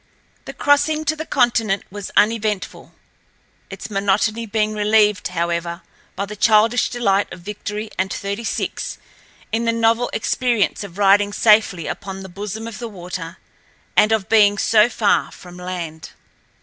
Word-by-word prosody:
The - - -7
crossing 295 +2 +2
to 310 - +1
the 315 +1 -6
continent 230 -6 +1
was 205 0 -7
uneventful, 215 -2 0 0.8
its - - -8
monotony 210 +3 0
being 215 0 0
relieved, 210 -1 +2
however, 170 0 -3 0.3
by 200 - -2
the 210 +1 -8
childish 220 +3 +3
delight 205 -5 0
of 180 - -9
Victory 210 +2 -6
and 190 0 0
Thirty 200 +3 -4
six - - -3 0.5
in 225 +1 0
the 230 - +3
novel 230 +1 +2
experience 230 -2 0
of 195 -2 -10
riding 205 0 +4
safely 210 -6 +3
upon 195 -1 -6
the 190 - -9
bosom 210 +4 -6
of 230 - -8
the 235 -1 -5
water, 180 -3 -7 0.6
and 210 +1 +5
of 220 -3 +1
being 205 -2 +4
so 215 +1 +4
far 220 -3 +1
from 180 -1 -13
land. 175 -3 -6
210 Hz, 150 wpm, -20 LUFS, 195-225 Hz, 0.8 s, and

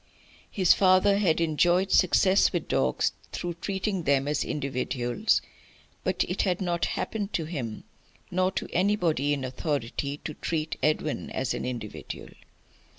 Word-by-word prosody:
His 185 -4 +4
father 195 +1 +4
had 170 -6 +2
enjoyed 175 +4 +2
success 185 +2 +4
with 175 -3 -2
dogs 65 -2 +1 0.2
through 175 -1 -3
treating 195 -1 -1
them 140 -3 +2
as 150 - 0
individuals. 130 - -1 0.6
But - - +1
it - - -1
had 185 -3 0
not 175 -3 0
happened 210 -2 -3
to 165 - -1
him, 130 -9 -5 0.5
nor 185 +1 +2
to - - -3
anybody 175 -7 +2
in 140 -2 -1
authority, 140 +1 -2
to 155 - -3
treat 155 0 -2
Edwin 155 0 0
as 130 - -2
an - - -4
individual. 120 -4 -6
165 Hz, 140 wpm, -27 LUFS, 140-185 Hz, 0.6 s, His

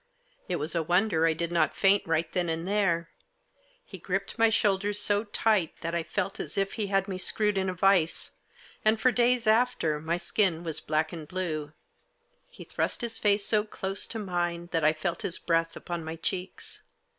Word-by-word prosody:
It 180 - 0
was 155 0 -3
a 170 - +1
wonder 175 0 +2
I 165 - +3
did 170 +1 -3
not 170 - +1
faint 195 +1 +4
right 165 0 0
then 175 -2 0
and 165 +2 -3
there. 175 -5 +1 0.7
He - - -10
gripped - - -3
my 225 0 +6
shoulders 205 -1 +1
so 205 +1 +2
tight 205 -5 +1
that 165 0 -3
I 170 - 0
felt 195 +3 -3
as - - -5
if 195 0 0
he 215 -3 -2
had 195 0 +1
me 185 -2 -4
screwed 210 +2 +3
in 190 -1 0
a 185 - -4
vice, 185 -3 +2 0.5
and 215 +1 +3
for 255 - +4
days 245 0 +2
after 215 -9 +2
my 165 +2 -1
skin 175 -1 0
was 160 -2 -2
black 155 +1 -1
and 160 -3 -7
blue. 155 -4 -4 0.8
He - - -12
thrust - - -2
his 235 -1 -4
face 205 -1 +2
so 210 -1 +2
close 195 -2 -3
to 230 - -5
mine 175 -4 -2
that 165 -2 0
I 155 - +5
felt 165 +2 -3
his 175 - 0
breath 165 -1 0
upon 175 -2 -5
my 160 +1 -5
cheeks. 180 +3 -5
180 Hz, 195 wpm, -28 LUFS, 165-205 Hz, 0.8 s, my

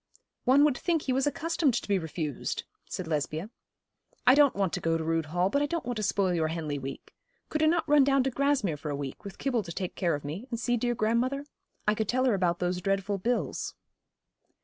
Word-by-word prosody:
'One 270 +3 +6
would 295 -3 +4
think 330 +1 0
he 260 - 0
was 270 +2 +1
accustomed 315 -3 +1
to - - -2
be 200 -2 +2
refused,' 160 -3 -3 0.3
said 185 - -4
Lesbia. 155 +5 -2 0.7
'I 250 - +8
don't 285 -1 +5
want 195 -4 0
to - - -1
go 165 0 +1
to 160 - -3
Rood 165 -1 0
Hall, 175 +4 +1
but 280 +9 +1
I 290 - +2
don't 335 +2 -3
want 245 -2 -3
to - - -1
spoil 200 -2 +1
your 160 -2 +1
Henley 155 -3 -3
week. 135 0 -8 0.4
Could 305 - -1
not 335 0 +2
I - - -3
run 295 -2 +7
down 275 -1 +3
to 270 - 0
Grasmere 270 - +1
for 150 - -5
a 145 - -1
week, 140 -2 -6
with 200 -1 -8
Kibble 250 -4 0
to 170 - -8
take 180 +1 -4
care 170 -5 +1
of 145 - -7
me, 175 - -5
and 235 - -3
see 245 0 +1
dear 240 +1 0
grandmother? 245 +6 0 0.4
I 210 - +5
could 215 -1 -2
tell 255 +1 +2
her 250 - +4
about 180 -3 +1
those 180 0 -1
dreadful 195 +1 0
bills.' 240 +6 -1
205 Hz, 235 wpm, -29 LUFS, 170-265 Hz, 0.7 s, I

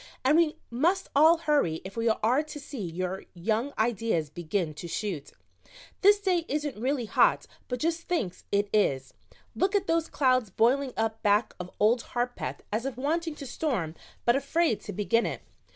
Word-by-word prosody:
"And 285 +3 +5
we 330 -1 +3 0.2
must 345 +11 +1
all 320 +4 +7
hurry 290 - +1
if 195 - -8
we 230 0 +1
are 230 +5 +2
to 305 -1 -8
see 280 -2 -8
your 185 +2 -3
young 220 +9 -1
ideas 220 -9 0
begin 170 0 -2
to 160 +3 -8
shoot. 170 -5 -4 0.7
This 410 +1 +6
day 370 -4 +1
isn't 295 0 -2
really 260 -1 0
hot, - - +3 0.2
but 250 - -2
just 330 +3 -1
thinks 235 - -2
it 205 0 +2
is. 135 -11 +1 0.4
Look 390 +2 +1
at 395 -1 +2
those 330 -2 0
clouds 255 -5 +2
boiling 255 +7 +2
up 225 0 -1
back 210 +2 +2
of 180 0 -6
Old 230 +3 +4 0.2
Harpeth 245 0 -2
as 225 +5 -1
if 270 - -5
wanting 320 +4 -1
to 280 - -8
storm, 240 - -2 0.3
but 240 - +4
afraid 280 -2 +1
to - - -5
begin 230 +4 +1
it. - - -5
240 Hz, 175 wpm, -28 LUFS, 205-300 Hz, 0.7 s, all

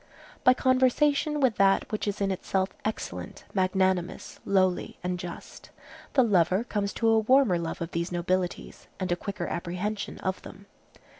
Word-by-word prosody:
By 255 - +6
conversation 280 +4 +2
with 260 -6 +2
that 195 0 +3
which 215 0 -2
is 205 0 -2
in 195 -1 +1
itself 190 0 -1
excellent, 90 - -5
magnanimous, 185 -2 0
lowly, 185 -2 +1
and 180 0 -2
just, 175 -1 -9 0.4
the 265 - +5
lover 190 -1 +3
comes 205 -4 -2
to 230 - 0
a 225 0 +5
warmer 225 -5 +4
love 165 0 -4
of 170 +1 -4
these 170 +1 -2
nobilities, 180 +1 -2
and 185 -1 -2
a - - +3
quicker 175 -1 -5
apprehension 185 +5 -3
of 190 0 -2
them. 200 +1 -12
190 Hz, 155 wpm, -27 LUFS, 180-220 Hz, 0.4 s, By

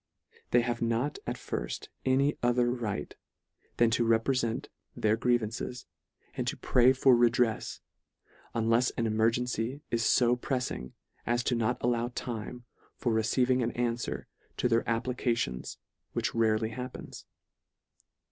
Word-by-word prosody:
They 120 - +4
have 120 -1 -2
not 115 +5 0
at - - -1
firft - - -5 0.2
any 135 +3 +3
other 120 0 +3
right, 110 - -3 0.6
than 120 -1 +4
to 120 +1 +2
reprefent 115 +1 +1 0.3
their 110 0 +2
grievances, 120 +1 -1 0.5
and - - -3
to - - -1
pray 125 0 +4
for 130 -1 +5
redrefs, 120 -1 +2 0.7
unlefs 115 +2 +2
an 115 - +1
emergency 115 +4 0
is 115 -1 +1
fo 120 -1 +4
preffing, 125 - -3 0.3
as 120 +2 +1
not 115 -2 0
to - - -1
allow 120 -1 +1
time 120 +1 -5 0.3
for 120 - 0
receiv 115 +3 +2
ing 130 0 +3
an 120 0 -1
anfwer 120 -1 -2 0.3
to - - +2
their 115 -1 +1
applications 115 - -1 0.4
which - - -1
rarely 110 -1 +2
happens. 125 +3 -8
120 Hz, 130 wpm, -30 LUFS, 115-125 Hz, 0.7 s, for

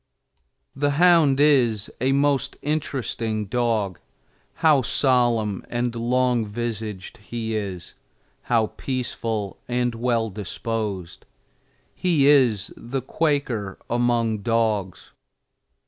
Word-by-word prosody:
The 145 +1 +1
hound 165 -6 +5
is 125 -8 +3
a 130 +1 +2
most 140 -1 +1
interesting 120 -7 -2
dog. 110 -4 -1 0.6
How 155 -4 +4
solemn 120 -6 +1
and 120 0 -1
long 120 0 +1
visaged 110 -1 -5
he 115 0 -5
is 95 -5 -5 0.6
how 115 -3 +2
peaceful 115 -5 -3
and 125 0 0
well 115 -1 0
disposed! 105 -2 -4 0.7
He 165 -6 +2
is 125 -9 +4
the 125 +2 -5
Quaker 130 -10 -1
among 120 -2 +1
dogs. 110 -4 -1
120 Hz, 95 wpm, -23 LUFS, 110-130 Hz, 0.7 s, hound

